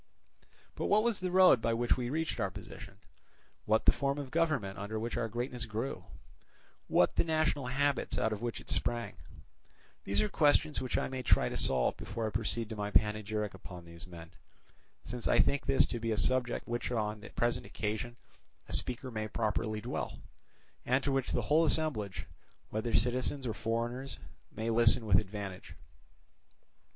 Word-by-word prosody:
But - - -2
what 210 +1 +4
was 235 -3 +1
the 185 0 -2
road 180 -9 +6
by 115 0 +1
which 120 +1 +2
we 120 -1 -3
reached 160 -1 -2
our 100 -3 +1
position, - - -10 0.7
what 110 +1 +2
the - - +8
form 140 0 -1
of 140 -3 -5
government 155 -14 0
under 105 +2 -3
which 115 +2 -3
our 115 - -1
greatness 120 +2 -3
grew, 110 +5 -4 0.8
what 90 - +3
the - - +5
national 155 -4 0
habits 140 +1 0
out 110 - +1
of 105 - -6
which 120 -1 -3
it - - -14
sprang; 120 -1 -2 0.9
these 100 +1 0
are - - +1
questions 150 +2 +3
which 130 - -1
I - - 0
may 130 -1 -4
try 125 - +3
to - - -5
solve 65 -2 +3
before 115 +1 -4
I 110 - -2
proceed 115 +1 -1
to 110 - -5
my 105 -1 -3
panegyric 105 0 +1
upon 90 -2 -10
these 85 +1 -10
men; 85 -2 -11 0.7
since 120 -1 -4
I - - +4
think 140 - +2
this 135 -1 +5
to 120 - -4
be 115 0 -1
a 110 - 0
subject 125 +3 +1
upon - - -10
which 120 +1 -2
on 105 -2 -1
the 105 - -10
present 120 0 -1
occasion 110 +3 -3 0.5
a - - -8
speaker 125 +1 -2
may 110 -1 -3
properly 110 0 -1
dwell, 120 +4 -4 0.7
and 130 +2 +2
to 140 - +1
which 135 -2 0
the - - 0
whole 155 +2 +4
assemblage, 110 - +1 0.5
whether 110 +2 -2
citizens 130 +2 +1
or 115 - -1
foreigners, 120 +5 -3 0.3
may 115 +1 -2
listen 115 +1 +4
with 90 -4 +5
advantage. 100 -2 -7
115 Hz, 180 wpm, -32 LUFS, 105-130 Hz, 0.9 s, the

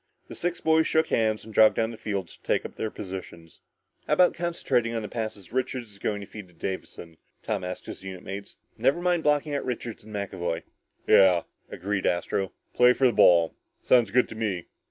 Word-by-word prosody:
The - - -7
six 175 0 -2
boys 160 0 +3
shook 160 0 +2
hands 110 -1 +1
and 110 - -11
jogged 110 0 +6
down 115 0 0
the - - -8
field 100 -5 -3
to - - -14
take - - 0
up - - -7
their 110 - -2
positions. 90 -5 -9 0.5
"How - - +2
about 180 -1 +5
concentrating 135 -9 0
on 115 - -2
the - - -4
passes 110 -3 -5
Richards 125 -3 -2
is 100 - -15
going 105 0 -2
to - - -7
feed 105 -1 -10
to 90 - -23
Davison," 85 -2 -6 0.3
Tom - - -2
asked 90 0 -5
his - - -8
unit 95 -2 -7
mates. 100 +1 -7 0.2
"Never 135 +8 +3
mind 175 -1 +1
blocking 150 0 +1
out 140 - -1
Richards 120 -3 -5
and 110 - -13
McAvoy." 90 -4 -3 0.4
"Yeah," 90 -3 +6 0.3
agreed 100 +2 -2
Astro, 90 +2 -1 0.2
"play 125 0 +6
for 135 - +1
the 125 - +4
ball. 85 -4 +5 0.3
Sounds 120 -4 +4
good 125 +5 +3
to - - -8
me." 105 -6 -2
110 Hz, 205 wpm, -26 LUFS, 95-125 Hz, 0.5 s, jogged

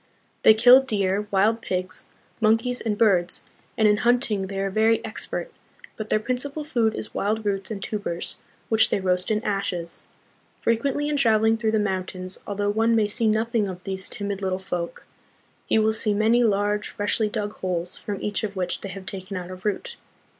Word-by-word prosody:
They 220 - +7
kill 245 +4 +8
deer, 205 -5 -1
wild 210 +4 +2
pigs, 185 -2 -4 0.3
monkeys, 225 +3 +2
and 210 -2 -1
birds, 185 -6 +2 0.3
and 220 - +5
in 210 0 +4
hunting 235 -4 +1
they 195 0 -4
are 195 0 -1
very 220 +2 +3
expert; 220 - -5 0.4
but 215 -1 -6
their - - +3
principal 265 +6 -3
food 235 -7 +1
is - - -6
wild 215 +2 -1
roots 195 -2 -1
and 200 -3 -5
tubers, 205 -5 -4 0.3
which 220 -1 +4
they - - +1
roast 180 -1 0
in 215 0 0
ashes. 180 -4 -3 0.6
Frequently 275 +5 +1
in 295 -1 0
travel 220 -5 +3
ing 225 0 +4
through 220 -1 0
the - - +4
mountains, 185 -2 -2
although 205 0 0
one 225 +2 +2
may 215 -2 +3
see 220 +2 -1
nothing 220 0 +1
of 185 -1 -7
these 190 -1 -4
timid 200 -1 -4
little 190 -1 0
folk, 180 -2 -5 0.6
he - - +3
will 220 0 +3
see 215 -1 0
many 225 +3 +4
large, 205 -1 +1
freshly 210 +1 0
dug 210 0 -3
holes 180 -1 -3
from 200 -2 -5
each 210 +1 -1
of 205 -2 -3
which 180 -2 -2
they 195 - -6
have 190 0 -8
taken 190 0 -6
out 180 0 -6
a - - -5
root. 215 - -3
210 Hz, 190 wpm, -24 LUFS, 190-225 Hz, 0.6 s, kill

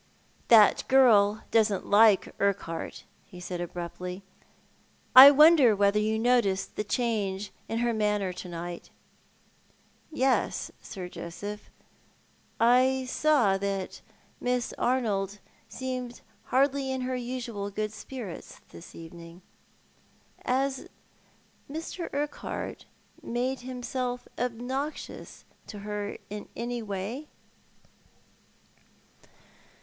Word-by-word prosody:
"That 220 -3 +6
girl 215 -6 +5
doesn't 215 -3 +2
like 210 -1 +5
Urquhart," 190 -5 -2 0.2
he 180 - -12
said, 180 0 -5
abruptly. 180 +2 -6 0.9
"I 265 +2 +13
wonder 290 -5 +7
whether 200 +1 +3
you 215 +1 0
noticed 225 -5 +1
the - - -2
change 205 -4 -2 0.2
in 225 - -2
her 235 - +1
manner 210 -3 0
to 180 - -8
night." 175 0 -7 0.7
" - - -35
Yes, 265 - 0
Sir 185 -4 -7
Joseph, 205 +5 -8 0.9
I 255 +3 +4
saw 250 -10 +2
that 195 -1 -3 0.4
Miss 250 -1 -1
Arnold 210 -6 0 0.3
seemed 255 -2 -5 0.2
hardly 270 0 +1
in 260 0 -2
her 255 0 -2
usual 240 -5 -4
good 215 +1 -3
spirits 220 -5 -8
this 170 - -13
evening. 170 +1 -12 1.0
Has 265 +1 -1 0.8
Mr. 325 +3 -6
Urquhart 290 +1 -4 0.4
made 250 +3 -2
himself 250 0 -4
obnoxious 250 +5 -4 0.2
to 210 - -8
her 210 -1 -4
in 210 0 -7
any 240 0 -3
way 215 +8 -5
225 Hz, 100 wpm, -28 LUFS, 200-255 Hz, 1.0 s, I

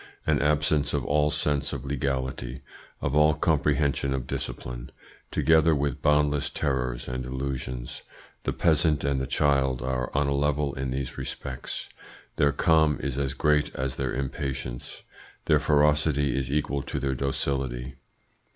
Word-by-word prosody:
An 75 -2 +2
absence 75 0 +2
of - - -1
all 75 +1 +3
sense 75 -1 0
of 65 - -5
legality, 65 -2 -2 0.4
of 70 - -1
all 75 0 +5
comprehension 70 -3 +1
of 65 -2 -3
discipline, - - -5 0.4
together 80 0 +4
with 70 0 -1
boundless 75 -1 +2
terrors 65 -4 -2
and 65 0 -3
illusions; 65 -1 -4 0.4
the - - 0
peasant 80 -2 +2
and 70 -1 +1
the 65 - -2
child 70 -3 +2
are 65 -1 -1
on 70 - +3
a 70 - +1
level 75 0 +1
in 65 0 -3
these 65 0 -4
respects. - - -5 0.5
Their 70 0 +4
calm 80 0 +3
is 70 0 -2
as 65 -1 -1
great 75 +1 +2
as 65 0 -2
their 65 -1 -1
impatience; 65 -2 -4 0.4
their 75 -2 +4
ferocity 75 -2 +3
is 65 -1 -1
equal 70 -1 0
to - - -4
their 65 -1 0
docility. 65 -1 -2
70 Hz, 145 wpm, -27 LUFS, 65-75 Hz, 0.5 s, all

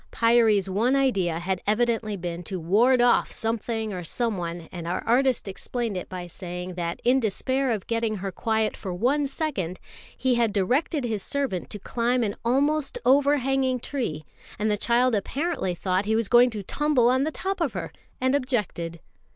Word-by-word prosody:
Pyârie's 230 -4 +3
one 225 +8 +1
idea 195 -12 +1
had 180 +2 -2
evidently 220 -1 +1
been 175 -1 -4
to 185 +1 -4
ward 230 +10 +4
off 245 0 +3
something 225 -1 -2
or 180 -1 -5
someone; 175 -5 -3
and 170 -2 -6
our 175 - -2
artist 255 0 +2
explained 225 +3 -3
it 180 - -5
by 180 -1 -6
saying 180 +1 -6
that 170 -1 -3
in 255 +2 +4
despair 260 +4 0
of 215 -5 -1
getting 230 -1 -1
her 195 -1 -4
quiet 220 +2 0
for 190 - -6
one 275 +9 +1
second, 260 - -3 0.4
he 260 -1 +2
had 235 -2 +2
directed 255 - +1
his 220 -4 -2
servant 270 -7 -2
to - - -6
climb 240 +4 0
an 205 -2 -2
almost 280 +5 +1
overhanging 270 -1 +3
tree, 225 - -4 0.3
and 215 +1 0
the - - +2
child 240 +4 +2
apparently 225 - -1
thought 185 +2 0
he 220 +1 +1
was 225 -2 +1
going 245 +2 +6
to 215 -4 -6
tumble 285 +2 +2
on 260 +2 +3
the 310 - 0
top 385 +5 -3
of - - 0
her, - - -5 0.3
and 260 +1 +1
objected. 210 - -2
225 Hz, 175 wpm, -25 LUFS, 190-255 Hz, 0.4 s, going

